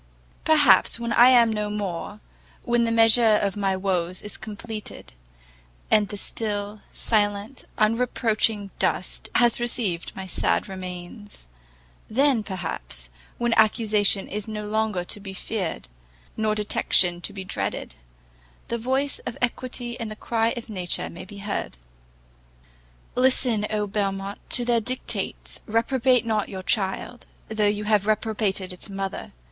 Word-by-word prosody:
Perhaps 290 -10 +5
when 235 0 -2
I 245 +2 +8
am 235 -3 +6
no 210 -1 -2
more, 205 0 -4 0.4
when 240 0 +2
the 230 - 0
measure 225 -1 +6
of 200 -1 -1
my 195 -2 0
woes 185 -2 -1
is 210 - -5
completed, 215 - -8 0.8
and 210 -1 +5
the 205 0 -6
still, 205 0 -3
silent, 205 +3 0
unreproaching 220 -2 +1
dust - - -1
has 240 -1 +4
received 230 -8 -1
my 190 - -6
sad 85 - +1
remains, 185 - -8 0.6
then, 265 +1 +3
perhaps, 175 - -6 0.3
when 240 -1 +1
accusation 215 -2 +3
is 210 +1 -5
no 210 -1 -4
longer 215 -4 0
to 190 - -6
be 195 -1 -7
feared, 190 - -4 0.5
nor 215 -1 +1
detection 180 -4 +2
to 205 - -3
be 195 -1 -6
dreaded, 100 - -4 0.8
the 235 - -1
voice 265 +4 0
of 245 - -4
equity 245 0 -2
and 230 -2 -3
the 215 - -6
cry 225 +1 0
of 235 - -6
nature 185 -5 -3
may 170 - -9
be 200 +2 -11
heard. 200 - -4 1.4
Listen, 250 -4 +2
Oh 210 -1 0
Belmont, 195 -1 -2
to 245 - +1
their 235 -1 +2
dictates! 250 +4 -3
reprobate 245 +2 +2
not 215 -2 0
your 190 -1 -6
child, 205 +4 -1 0.2
though 215 -1 +1
you 205 0 0
have 210 -1 +2
reprobated 210 -3 0
its 180 - -7
mother. 195 - -4
210 Hz, 140 wpm, -25 LUFS, 195-230 Hz, 1.4 s, I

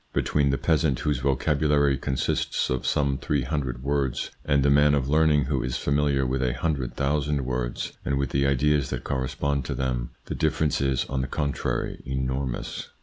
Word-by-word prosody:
Between 70 -2 +1
the 70 - +1
peasant 80 -4 +1
whose 75 -4 0
vocabulary 70 +1 +2
consists 65 -1 -1
of 65 - -1
some 70 -3 +1
three 70 -1 0
hundred 65 -3 -3
words, 70 -2 -1
and 70 -1 +2
the 70 - +4
man 75 +1 +5
of 70 -2 0
learning 75 -1 +4
who 65 0 -1
is 65 0 -2
familiar 70 -1 +1
with 65 +1 -1
a 65 -2 +1
hundred 70 -6 -2
thousand 70 -1 0
words 60 -1 -2
and 70 - 0
with 70 0 -1
the 70 0 +2
ideas 70 0 +2
that - - -4
corre 65 -2 -1
spond 70 0 -1
to - - -3
them, 60 -2 -2 0.2
the - - -4
difference 75 -3 0
is, 65 -2 +1
on 65 -1 -2
the 65 - -2
contrary, 70 +1 -2
enormous. 65 -1 -3
70 Hz, 185 wpm, -26 LUFS, 65-75 Hz, 0.2 s, man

